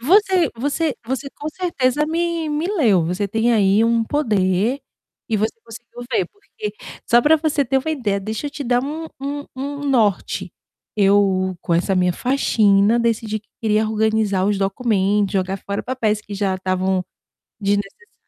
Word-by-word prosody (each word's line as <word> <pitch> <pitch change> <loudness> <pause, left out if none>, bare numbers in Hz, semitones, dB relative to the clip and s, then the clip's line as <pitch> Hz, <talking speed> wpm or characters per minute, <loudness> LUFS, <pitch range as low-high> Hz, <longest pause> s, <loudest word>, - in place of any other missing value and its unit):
Você 370 - +4
você 290 +4 -1
você, 265 +4 -3
com 295 - -6
certeza, 300 -5 0
me 335 0 -1
me 300 +3 -1
leu, 230 - +3
você 180 +5 -1
tem 225 +4 +1
aí 205 -1 +4
um 230 0 +2
poder 220 -2 +1 0.5
e 225 - +1
você 215 +2 +1
conseguiu 240 +1 -11
ver, - - +1
porque, 425 +1 -8 0.3
só 240 +1 +5
para 305 +5 +5
você 300 -2 0
ter 270 +2 0
uma 300 +4 -3
ideia, 225 -10 -1
deixa 220 +7 -4
eu - - -4
te 285 - -6
dar 245 -1 +2
um 310 +4 -4
um 285 +1 -3 0.2
um 260 - -4 0.2
um 290 - -3
norte, 220 -8 +1 0.4
eu 195 -2 +3
com 170 - 0
essa 185 +3 +1
minha 180 -1 +2
faxina, 215 -3 +3
decidi 225 -2 -1
que 215 - -42
queria 215 -1 +1
organizar 220 -3 +1
os 205 -1 +1
documento, 200 -1 +1
jogar 190 0 0
fora 200 +1 -4
papéis 220 -5 -1
que 205 - -12
já 195 -1 0
estavam 185 0 -1 0.6
desnecessários, 205 - -2
225 Hz, 165 wpm, -20 LUFS, 200-280 Hz, 0.6 s, só